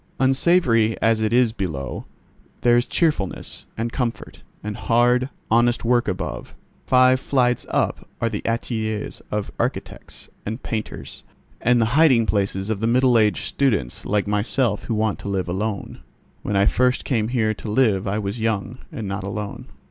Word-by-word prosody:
Unsavoury 130 -5 +3
as 115 -1 +2
it 110 -1 +1
is 120 -2 +3
below, 80 - -4 0.6
there 120 -1 +4
is 120 +1 +2
cheerfulness, 150 - -1
and 115 +1 -2
comfort, 120 -3 -4 0.2
and 105 0 -4
hard, 125 +4 +2 0.2
honest 120 +1 +3
work 120 0 +2
above. 95 -2 -4 0.3
Five 130 0 +5
flights 125 -3 +1
up - - -1
are 115 - +1
the - - -3
ateliers 110 -2 -3
of 105 -1 -3
architects - - -4 0.2
and 110 +5 -5
painters, 110 -2 -5 0.4
and 125 +1 +3
the 115 - +3
hiding 140 -7 +5
places 100 -1 -1
of 105 -2 -3
middle 125 +2 +3
aged 105 -7 +3
students 100 - 0
like 105 -1 0
myself 105 +2 0
who 115 - -1
want 110 -1 0
to - - -6
live 95 -2 -1
alone. 100 +3 -3 0.4
When 105 - -2
I 100 0 +4
first 125 +4 +2
came 110 -5 0
here 110 -3 +1
to 110 - -8
live 105 -4 +2
I 100 +2 0
was 105 +2 -3
young, 110 +2 -2
and 115 -10 -5
not 95 0 -4
alone. 100 +1 -5
110 Hz, 160 wpm, -22 LUFS, 105-125 Hz, 0.6 s, Five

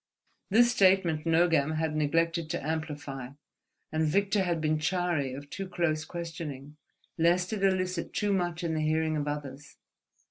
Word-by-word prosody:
This 235 +4 +5
statement 185 -7 +3
Nogam 160 -2 +3
had 155 -1 -1
neglected 165 +2 +1
to 170 -4 -3
amplify, 145 -5 -4 0.6
and 155 0 0
Victor 200 +5 +2
had 175 -3 0
been 155 0 +1
chary 170 -4 0
of 140 +1 -9
too 195 -1 -5
close 160 -3 0
questioning, 160 -5 -7 0.4
lest 175 +4 +2
it 200 -2 -2
elicit 185 -2 0
too 205 -1 0
much 175 -2 -1
in 165 -1 -1
the 155 - -1
hearing 155 0 +1
of 150 -1 -2
others. 145 -1 -6
160 Hz, 150 wpm, -29 LUFS, 155-180 Hz, 0.6 s, This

